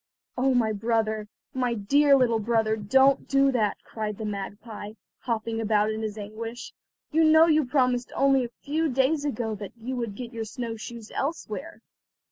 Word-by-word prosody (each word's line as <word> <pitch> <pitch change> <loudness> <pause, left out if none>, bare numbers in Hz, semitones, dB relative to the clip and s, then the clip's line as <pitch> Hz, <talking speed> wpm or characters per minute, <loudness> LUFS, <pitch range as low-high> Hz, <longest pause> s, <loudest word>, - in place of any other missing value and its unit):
"Oh, 260 +1 +2
my 225 -3 +2
brother, 220 0 -1 0.3
my 250 -3 0
dear 280 +7 +4
little 235 -3 +2
brother, 220 0 +1
don't 265 +6 +3
do 275 0 +4
that," 220 -5 +1
cried 210 -2 -5
the 220 - -5
magpie, 205 +1 -6 0.3
hopping 225 -1 -2
about 215 -1 +2
in 220 0 -4
his 215 -1 -4
anguish. 225 +3 -7 0.4
"You 320 +1 +4
know 315 +1 +7
you 310 -3 +3
promised 250 -2 +1
only 275 -1 +4
a - - -7
few 315 +2 0
days 270 +3 +1
ago 230 -5 -2
that 205 -2 -7
you 245 +3 -5
would 230 -4 -3
get 240 +1 -7
your 225 -1 -4
snow 230 +1 -5
shoes 225 0 -9
elsewhere." 295 +1 -4
235 Hz, 170 wpm, -26 LUFS, 215-270 Hz, 0.4 s, know